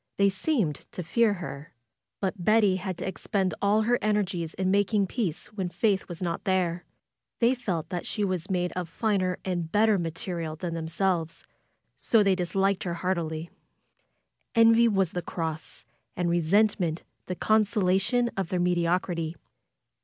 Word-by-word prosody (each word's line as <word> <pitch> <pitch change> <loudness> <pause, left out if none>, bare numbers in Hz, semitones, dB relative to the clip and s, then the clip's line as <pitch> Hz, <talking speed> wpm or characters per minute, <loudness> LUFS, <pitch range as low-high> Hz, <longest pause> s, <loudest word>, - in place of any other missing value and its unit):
They 200 0 +4
seemed 190 - 0 0.2
to 180 - -4
fear 210 +6 +2
her. 155 -6 -8 0.4
But 190 -2 -2
Betty 210 -2 +4
had 185 -2 -4
to - - -5
ex 190 - -6
pend 190 -4 +1
all 210 +2 +3
her 240 +2 +2
energies 195 -6 -1
in 185 0 0
making 200 +1 +2
peace 190 -3 -3
when 190 -4 -2
Faith 200 +1 0
was 175 0 -6
not 170 -1 -2
there. 180 -2 0 0.5
They 235 +2 +4
felt 180 -10 -3
that 175 -1 -4
she 210 - -2
was 185 -4 -2
made 180 -2 0
of 180 -2 -4
finer 185 -1 0
and 175 -3 -2
bet 210 +3 +4
ter 205 -3 +3
material 165 -1 -4
than 170 +1 -4
themselves, 165 0 -1 0.5
so 225 -3 +3
they 195 -1 +4
disliked 190 +2 0
her 175 -2 -2
heartily. 170 -2 -2 1.0
Envy 230 +1 +6
was 195 -5 +2
the 180 - -3
cross, 160 -2 -5 0.3
and 175 -1 +1
resentment 175 0 +2 0.2
the 180 - -3
con 215 +4 +3
solation 205 +3 +1
of 190 -4 -2
their 180 - -1
mediocrity. 175 -1 0
185 Hz, 160 wpm, -27 LUFS, 170-205 Hz, 1.0 s, Envy